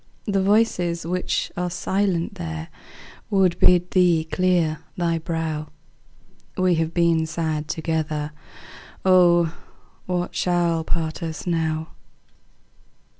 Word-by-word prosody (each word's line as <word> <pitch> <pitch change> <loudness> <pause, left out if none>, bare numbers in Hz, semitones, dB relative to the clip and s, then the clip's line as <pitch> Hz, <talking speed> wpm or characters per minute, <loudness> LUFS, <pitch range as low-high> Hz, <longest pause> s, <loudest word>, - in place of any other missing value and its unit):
The 195 -2 +1
voices 190 -5 +2
which 180 +2 -1
are 180 0 -1
silent 190 0 -1
there 165 -3 -6 0.6
Would 190 -4 +2
bid 180 0 +4
thee 175 -4 +4
clear 170 -2 +1 0.2
thy 170 -2 0
brow; 160 -2 -3 0.9
We 185 -1 +3
have 160 0 -1
been 165 -2 +2
sad 155 -2 -2
together. 155 -2 -2 0.7
Oh, 175 -3 +5 0.5
what 180 -1 -2
shall 170 -2 +1
part 160 +1 -2
us 160 -2 -5
now? 160 -2 -1
170 Hz, 105 wpm, -23 LUFS, 160-180 Hz, 0.9 s, Oh